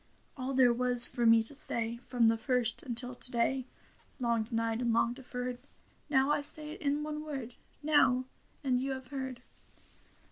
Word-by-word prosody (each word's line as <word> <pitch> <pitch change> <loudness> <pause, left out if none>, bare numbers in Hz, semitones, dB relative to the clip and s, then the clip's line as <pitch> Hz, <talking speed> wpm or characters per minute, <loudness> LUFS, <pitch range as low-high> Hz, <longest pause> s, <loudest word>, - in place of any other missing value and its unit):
All 265 0 -5
there 250 -2 +4
was 245 0 +6
for 240 -1 -1
me 225 0 +5
to 225 - -16
say 235 -4 +2
From 240 -3 +2
the 225 - +3
first 240 0 -2
until 245 +1 -2
to 250 - +4
day. 245 +2 -1 0.5
Long 235 -2 0
denied 225 0 -3
and 240 -1 0
long 235 +1 +1
deferred. 250 -1 -7 0.5
Now 270 0 +2
I 295 - 0
say 300 +1 +3
it - - -11
in 290 +1 -1
one 305 0 -5
word 270 -6 -7 0.2
— - - -36
Now; 255 -3 +3 0.4
and 255 -2 0
you 270 +1 -3
have 260 -1 -9
heard. 260 -3 -6
250 Hz, 180 wpm, -30 LUFS, 235-270 Hz, 0.5 s, was